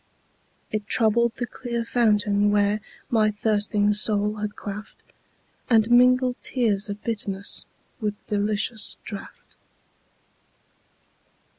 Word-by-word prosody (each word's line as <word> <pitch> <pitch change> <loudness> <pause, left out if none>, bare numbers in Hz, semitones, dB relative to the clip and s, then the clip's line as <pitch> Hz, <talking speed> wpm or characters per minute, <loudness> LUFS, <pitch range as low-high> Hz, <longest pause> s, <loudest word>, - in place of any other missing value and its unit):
It 215 -1 -3
troubled 230 +1 +3
the 245 - -3
clear 235 -2 -4
fountain 210 -3 +2
where 205 +1 +2 0.3
My 215 -2 +3
thirsting 210 0 +1
soul 210 0 +1
had 210 0 -4
quaffed, 210 +1 -8 0.7
And 225 -1 +4
mingled 250 +1 +5
tears 210 -5 0
of 205 +1 -6
bitterness 200 -3 -3 0.3
With 210 -3 -2
the 210 - -1
delicious 210 +2 0
draught. 205 -3 -10
210 Hz, 105 wpm, -24 LUFS, 205-230 Hz, 0.7 s, mingled